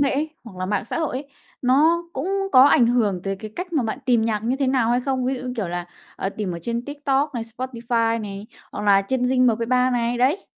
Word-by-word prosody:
nghệ 280 -1 +3
ấy, 305 +3 -1
hoặc 200 -5 -11
là 185 - -2
mạng 205 0 -1
xã 235 - -3
hội 310 -5 -1
ấy, 280 +1 -7 0.3
nó 310 +7 +4
cũng 275 +8 -3 0.2
có 255 - +8
ảnh 250 -4 +6
hưởng 215 -7 +1
tới 195 0 -2
cái 215 +2 -8
cách 360 -1 -5
mà 290 -6 +2
bạn 225 +4 -3
tìm 240 -3 +3
nhạc 215 -2 -1
như 250 +4 0
thế 275 -1 0
nào 255 -3 +2
hay 245 - +2
không? 260 -1 -1
Ví 265 +1 0
dụ 250 - -6
như, 250 -1 -4
kiểu 195 -6 -2
là, 175 0 -4 0.5
tìm 200 -5 -2
ở 170 - -5
trên 235 +1 -3
TikTok 285 -1 -1
này, 235 - -2
Spotify 230 -2 -1
này, 200 0 -7 0.3
hoặc 205 - -5
là 195 -1 +5
trên 250 +5 -1
Zing 255 0 +3
MP3 250 +2 +2
này, 240 0 0
đấy, 280 +10 +1
245 Hz, 250 wpm, -23 LUFS, 220-265 Hz, 0.5 s, có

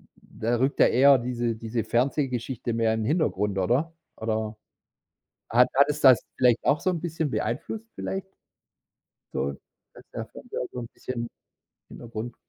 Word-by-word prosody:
da 115 +2 -3
rückt 135 +3 0
ja - - +8
eher 135 +2 +6
diese 120 -1 -1
diese 115 +1 -3
Fernsehgeschichte 125 -1 -1
mehr 115 -1 +2
in 110 - -1
'n - - -2
Hintergrund, 105 - 0
oder? 135 - +1 0.2
Oder 110 -1 -2 0.9
hat 125 +2 +5
hat 140 +2 +6
es 150 0 -2
das 130 -3 +7
vielleicht 125 -2 +4
auch 145 +1 +3
so - - +1
'n 175 -2 -1
bisschen 160 -3 -2
beeinflusst 210 - -3
vielleicht? 195 0 -4 1.1
So, 70 +1 -1 0.4
dass - - -14
der - - -4
Fernseher - - -7
so 125 - -5
'n 120 - -6
bisschen 120 -2 -4 0.6
Hintergrund 120 0 -7
120 Hz, 155 wpm, -26 LUFS, 115-140 Hz, 1.1 s, ja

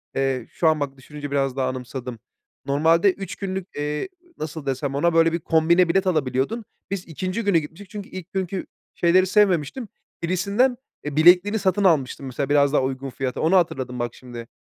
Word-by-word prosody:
eee, 135 -3 -1
şu 165 - 0
an, 155 -1 +3
bak 140 -1 -3
düşününce 145 +2 -8
biraz 135 -2 0
daha 130 -1 0
anımsadım. 125 -1 -6 0.5
Normalde 165 +7 +3
3 195 0 -7
günlük, 190 -2 -4
eee, 150 - -3 0.3
nasıl 155 -1 -6
desem 135 +1 -2
ona, 170 +4 +2
böyle 165 0 +4
bir 170 - 0
kombine 170 +2 +3
bilet 190 +2 +2
alabiliyordun. 150 - 0 0.3
Biz 195 -2 -4
2'nci 185 +7 -3
günü 200 -4 +3
gitmiştik, 165 +5 -6
çünkü 205 -2 -8
ilk 185 -1 -9
günkü 190 -1 -2 0.3
şeyleri 185 +2 +3
sevmemiştim. 195 - +2 0.4
Birisinden, 200 +9 +1 0.3
e, 150 -1 -4
bilekliğini 180 +7 +5
satın 195 +1 +1
almıştım 140 -7 +2
mesela, 130 +1 -3
biraz 145 -1 +3
daha - - +4
uygun 135 +1 -3
fiyata. 130 0 -3
Onu 165 +4 +3
hatırladım 130 -8 0
bak 120 0 -3
şimdi. 120 -2 -9
160 Hz, 175 wpm, -23 LUFS, 135-185 Hz, 0.5 s, bilekliğini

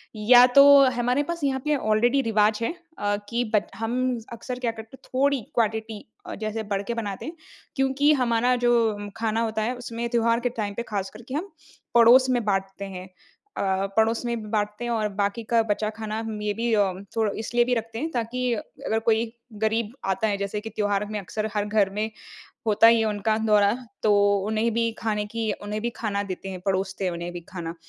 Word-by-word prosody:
या 245 +4 +7
तो - - +11 0.3
हमारे 250 +3 +1
पास 340 +1 -5
यहाँ 270 -1 +1
पे 300 0 +2
ऑलरेडी 240 +2 +2
रिवाज 210 -1 +3
है 230 - -1 0.2
अ, 205 0 0
कि 240 +1 0
बत 210 - +2
हम 225 +4 -2 0.3
अक्सर 245 +2 -6
क्या 240 -2 0
करते 225 +3 -11
हैं - - -22
थोड़ी 275 0 +2
क्वांटिटी 220 -1 -1 0.2
अ, - - -6
जैसे 215 +1 -4
बढ़ 200 -1 -2
के 235 - -1
बनाते 205 -4 -4
हैं। 320 - -6 0.4
क्योंकि 270 +1 +3
हमारा 240 +1 +2
जो 240 - +5 0.4
खाना 225 0 0
होता 220 -1 -1
है 240 +4 -1
उसमें 235 -1 -5
त्योहार 230 -1 +2
के 245 - -1
टाइम 205 -1 -3
पे 235 - -4
खास 195 -1 -1
करके 240 +3 -10
हम 370 +7 -4 0.4
पड़ोस 245 +3 +7
में 245 -2 +1
बाँटते 195 -1 -2
हैं। 185 -1 -8 0.5
अ, - - -1 0.4
पड़ोस 225 +1 +2
में 235 -3 -3
बाँटते 210 +1 -1
हैं 240 - -2
और 220 -2 0
बाकी 205 +3 -1
का 230 -1 +4
बचा 215 +1 0
खाना 220 0 -4
मे 210 -1 -2
बी 235 0 0
अ, 210 - +4
उम, 190 -1 -1
थोड़ा 220 -2 +1
इसलिए 240 +2 +1
भी 250 - 0
रखते 225 0 -4
हैं 315 +5 -2
ताकि 245 0 -1
अगर 220 +1 -3
कोई 225 0 +3 0.4
गरीब 220 0 0 0.2
आता 220 +3 -1
है 205 -1 0
जैसे 200 +1 -3
कि 225 - -6
त्योहार 205 -1 -1
में 210 - -2
अक्सर 215 +3 -4
हर 205 -1 +1
घर 210 -2 +2
में 215 +1 0 0.6
होता 215 +1 +5
ही 230 0 +7
है - - +2
उनका 215 +1 0
दौरा, 205 -1 +4 0.3
तो 215 - +4 0.3
उन्हें 220 +2 +1
भी 230 0 +1
खाने 210 -2 -1
की 225 -1 -1
उन्हें 210 +1 -4
भी 235 - -1
खाना 205 -3 -2
देते 195 -1 -6
हैं। 185 -1 -6
परोसते 190 0 -1
हैं 180 - 0
उन्हें 170 +1 -5
भी 175 - -6
खाना। 170 -3 -6
220 Hz, 205 wpm, -25 LUFS, 210-235 Hz, 0.6 s, तो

